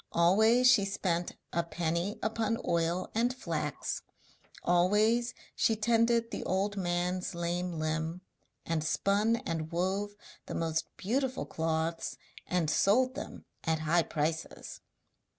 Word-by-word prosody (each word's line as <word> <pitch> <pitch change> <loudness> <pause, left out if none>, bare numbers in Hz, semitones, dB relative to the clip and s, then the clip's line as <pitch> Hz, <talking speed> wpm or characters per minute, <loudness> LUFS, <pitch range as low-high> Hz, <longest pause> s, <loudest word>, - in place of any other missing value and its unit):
Always 220 +9 +5
she 235 -5 +6
spent 180 -3 -1 0.2
a 170 - +2
penny 170 +4 -2
upon 225 0 0
oil 170 +2 0
and 235 +3 +2
flax, 255 - -3 0.6
always 210 +7 +3 0.2
she 225 - +3
tended 230 +1 +2
the - - -4
old 195 +2 0
man's 180 -1 -1
lame 175 +1 -2
limb, 160 +2 -2 0.4
and 165 -2 0
spun 205 +7 +2
and 160 -6 -3
wove 195 +4 -1 0.3
the - - -4
most 160 -1 0
beautiful 260 +5 -1
cloths 160 +1 -2 0.3
and 180 -3 +1
sold 250 +11 +3
them - - -7 0.2
at 160 -1 0
high 165 +2 +3
prices. 160 0 -3
180 Hz, 120 wpm, -31 LUFS, 165-220 Hz, 0.6 s, she